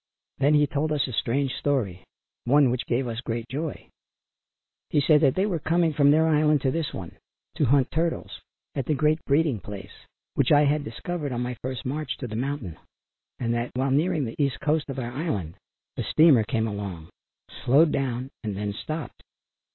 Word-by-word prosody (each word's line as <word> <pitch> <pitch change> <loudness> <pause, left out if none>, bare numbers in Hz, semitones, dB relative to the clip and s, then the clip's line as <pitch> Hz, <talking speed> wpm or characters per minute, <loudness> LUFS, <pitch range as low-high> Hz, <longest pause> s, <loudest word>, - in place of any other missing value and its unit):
Then 145 +3 +4
he 150 0 +5
told 150 +2 -1
us 150 -2 +1
a 130 - -6
strange 130 +4 0
story, 110 -11 -1 0.4
one 135 0 +5
which 125 0 -3
gave 125 +1 0
us 115 0 -4
great 115 -1 -4
joy. 150 +3 -4 1.0
He - - +2
said 150 +1 +4
that 135 -4 +4
they 190 - +2
were 180 -6 -1
coming 165 +1 +1
from 140 0 +4
their 155 +2 +5
island 150 -2 +3
to 130 - +1
this 160 +1 -2
one 85 -3 -8 0.4
to 150 - +3
hunt 135 0 +3
turtles, 165 +1 -2 0.3
at 135 -3 -3
the 155 - +2
great 155 +2 +1
breeding 140 -4 +2
place 100 0 -9 0.4
which 140 0 +1
I 145 -1 +7
had 145 +1 +2
discovered 145 +6 -4
on 120 -1 -2
my 125 0 -3
first 130 0 -5
march 150 +4 -3
to 130 - -5
the 110 - -6
mountain, 125 - -3 0.6
and 120 -1 -1
that, 120 +1 -1
while 130 +1 0
nearing 155 +1 +2
the 115 - -6
east 140 -2 0
coast 150 0 0
of 135 - -5
our 120 -2 -3
island 120 - -3 0.4
a - - -1
steamer 155 -8 +5
came 110 0 0
along, 100 -6 -6 0.5
slowed 145 +5 +5
down 130 -1 -2
and 105 -3 -3
then 105 0 -2
stopped. 155 +5 -6
135 Hz, 190 wpm, -26 LUFS, 120-150 Hz, 1.0 s, I